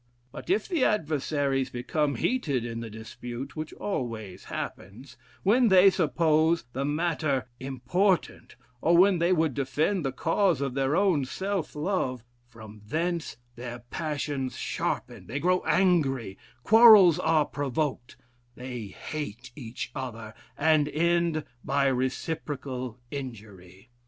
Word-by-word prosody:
But - - -10
if 390 +4 +1
the 340 -8 0
adversaries 145 -6 0
become 140 +4 -1
heated 140 - 0
in 115 -1 -5
the 115 -1 -6
dispute, 120 +4 -8
which 155 0 -5
always 110 - -5
happens, 110 +9 -7 0.3
when 235 +5 +4
they 190 -1 +7
suppose 160 -1 +2
the 135 - -2
matter 150 -3 0
important, 140 - -1 0.3
or 170 +1 +4
when 185 0 +5
they 170 +2 +2
would 160 -5 +2
defend 150 +8 0
the 135 - -1
cause 165 +4 +1
of 140 -2 -2
their 135 +2 +1
own 185 -8 +2
self 190 +4 -3
love, 150 - -1 0.2
from 110 -3 -13
thence 165 +7 -2 0.2
their 120 0 -6
passions 145 -4 -3
sharpen, - - -3
they 135 +6 -3
grow 180 +3 +2
angry, 155 - +2 0.3
quarrels 215 -7 +8
are 160 -2 +3
provoked, 140 -3 -3 0.4
they 125 -4 -6
hate 125 +1 -7
each 120 -3 -6
other, 115 -5 -6 0.2
and 155 -1 +3
end 170 0 +1 0.2
by 140 0 +1
reciprocal 130 -1 -3
injury. 105 -6 -9
145 Hz, 125 wpm, -27 LUFS, 125-170 Hz, 0.4 s, quarrels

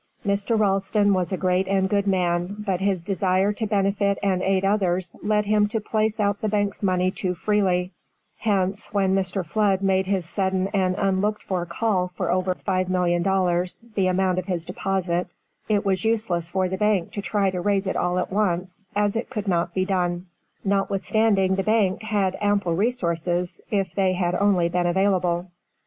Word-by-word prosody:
Mr. 200 +3 +1
Ralston 205 0 +2
was 185 -2 0
a 190 - -1
great 185 +1 +1
and 190 -1 +2
good 200 +1 0
man, 180 0 0
but 195 -4 -2
his 190 -3 0
desire 190 +1 +1
to 220 +1 -3
benefit 200 -1 +1
and 190 -2 +1
aid 190 0 +1
others 185 -3 0
led 210 0 +1
him 210 0 +3
to 225 +1 -2
place 215 +1 -1
out 205 -1 0
the 215 - 0
bank's 205 -1 -1
money 185 -2 +1
too 185 -1 -3
freely; 185 -2 +1 0.5
hence, 200 -1 0
when 195 -2 +1
Mr. 190 -1 -1
Flood 195 +1 +1
made 190 -1 +2
his 190 -4 -1
sudden 190 +1 0
and 190 -2 +1
unlooked 195 +2 0
for 180 -2 -2
call 185 +1 0
for 180 - -3
over 185 0 0
$5,000,000, 185 +2 0
the 195 -3 +1
amount 185 0 +1
of 180 - -6
his 175 -3 -2
deposit, 180 -1 -1 0.4
it 205 -1 +1
was 190 -2 0
useless 210 -7 0
for 190 0 0
the 190 +1 -3
bank 205 -4 +1
to 205 - -4
try 200 -2 0
to 180 -1 -3
raise 200 +1 +1
it 190 - -2
at 180 +1 -1
once, 185 -2 -1
as 205 0 +1
it 230 - -3
could 215 -5 -4
not 175 -2 +1
be 185 0 +1
done, 180 -2 -1 0.4
notwithstanding 195 0 +1
the 195 - +1
bank 215 -3 +1
had 205 -4 0
ample 205 -4 +1
resources, 175 -5 -1
if 195 -3 -1
they 190 -2 +2
had 180 -1 0
only 185 -2 +2
been 175 0 0
available. 180 -1 +1
190 Hz, 175 wpm, -24 LUFS, 180-205 Hz, 0.5 s, him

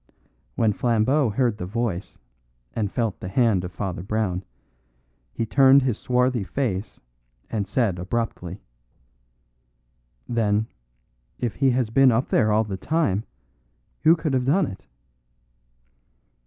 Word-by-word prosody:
When 110 -2 +2
Flambeau 120 +5 +2
heard 115 0 0
the 90 - -4
voice, 105 -3 -3 0.6
and 105 -3 -2
felt 115 -5 -2
the - - -6
hand 100 -2 +2
of 90 - -5
Father 95 -2 -4
Brown, 100 -2 -2 0.9
he 115 - -2
turned 135 +4 +5
his 125 -5 -1
swarthy 125 -2 +1
face 105 -3 -3 0.5
and 105 -3 -2
said 100 -4 0
abruptly: 95 -2 -4 1.6
"Then, 110 -2 +1 0.7
if 120 -4 -2
he 135 -1 +3
has 125 -3 0
been 135 +2 +5
up 115 +3 0
there 110 -2 +3
all 110 +1 +3
the 100 -3 -5
time, 110 - 0 0.8
who 160 +2 +6
can 155 -3 -2
have 130 -1 +1
done 165 +7 +3
it?" 95 - -9
110 Hz, 130 wpm, -24 LUFS, 100-130 Hz, 1.6 s, who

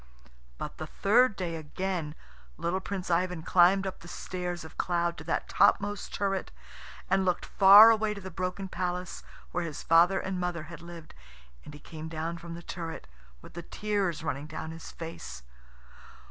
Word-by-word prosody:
But - - -7
the - - -5
third 235 +3 +3
day 175 -3 -3
again 160 0 -4 0.4
little 175 +3 -1
Prince 190 -1 -4
Ivan 180 -1 0
climbed 185 +3 +4
up 190 - -5
the 170 - -13
stairs 175 -1 -5
of 160 - -12
cloud 170 -1 0
to - - -8
that 165 - -1
topmost 205 0 +2
turret, 195 -1 -1 0.6
and 195 0 +2
looked 180 -1 0
far 205 +3 +9
away 215 -1 +1
to - - -7
the 190 0 -8
broken 185 +2 -3
palace 180 0 -3 0.3
where 180 - -1
his 155 -3 -6
father 170 +4 +5
and 190 -1 -3
mother 175 -2 -2
had 165 +1 -10
lived. 170 -2 -11 0.5
And 150 - -10
he - - -11
came 160 +1 -8
down 165 +1 -4
from 170 0 -8
the 170 - -9
turret 165 - -6 0.4
with - - -13
the 170 - -6
tears 195 -2 -2
running 145 -2 -3
down 155 +1 -6
his 165 0 -9
face. 165 - -8
175 Hz, 175 wpm, -29 LUFS, 165-190 Hz, 0.6 s, far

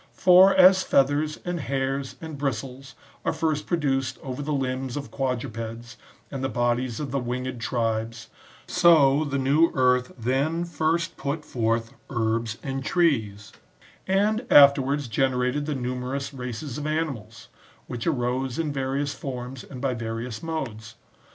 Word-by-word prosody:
^ - - -33
For 185 +1 +7
as 185 +1 +7
feathers, 145 +1 +2
and 175 -1 -2
hairs, 135 -1 -2
and 160 -2 -7
bristles, 135 0 -4 0.3
are - - +1
first 160 -2 -1
produced 135 -6 0
over 130 +1 -5
the 150 +1 -3
limbs 130 -1 -2
of 140 - -6
quadrupeds 115 -3 -4 0.4
and 135 -2 -4
the 135 - 0
bodies 120 0 -1
of 145 -4 -4
the 140 - 0
winged 125 0 -4
tribes, 115 -1 -2 0.4
so 155 -5 +5
the 140 -2 -2
new 140 +5 +3
earth 125 -1 +2
then 140 +8 0
first 165 +1 -1
put 150 +2 -3
forth 115 -1 -1 0.2
herbs 115 -2 -1
and 135 -1 -3
trees; 110 - 0 0.6
and 210 +4 +2
afterwards 140 -1 +6
generated 125 +4 0
the 150 - -1
numerous 130 +2 -3
races 125 +1 -5
of 150 - -4
animals,^ 125 -9 -4 0.4
which 120 +3 -5
arose 125 -3 -1
in 155 -3 -1
various 140 +1 -2
forms 125 -1 -6
and 130 -3 -10
by 135 -2 0
various 115 0 -5
modes. 115 -9 -5
135 Hz, 145 wpm, -25 LUFS, 120-150 Hz, 0.6 s, For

